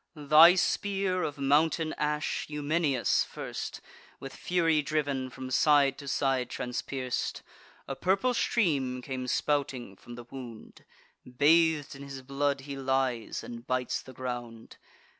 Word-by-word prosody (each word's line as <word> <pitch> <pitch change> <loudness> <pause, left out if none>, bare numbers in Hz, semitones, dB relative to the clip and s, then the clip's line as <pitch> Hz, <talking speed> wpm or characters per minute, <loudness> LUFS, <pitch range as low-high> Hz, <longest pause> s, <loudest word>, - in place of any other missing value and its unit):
Thy 155 +4 +7
spear, 190 0 0
of 145 - -3
mountain 155 +3 +2
ash, 150 0 -1
Eumenius 150 -3 +1
first, - - -6 0.4
With 135 - -8
fury 165 -3 +1
driv'n, 140 -3 -1
from 130 0 -8
side 140 -1 +4
to 140 - -9
side 135 -3 0
transpierc'd: 125 0 -3 0.4
A 135 - -4
purple 195 - +1
stream 140 - 0
came 130 -1 -4
spouting 130 -7 -1
from 120 +5 -12
the 120 0 -10
wound; 120 -5 -10 0.4
Bath'd 150 +3 +3
in 140 - -11
his 135 -1 -8
blood 140 +1 -1
he 140 +1 -7
lies, 130 -4 -1
and 120 0 -9
bites 130 0 -1
the 130 - -12
ground. 120 -2 -6
140 Hz, 130 wpm, -29 LUFS, 130-155 Hz, 0.4 s, Thy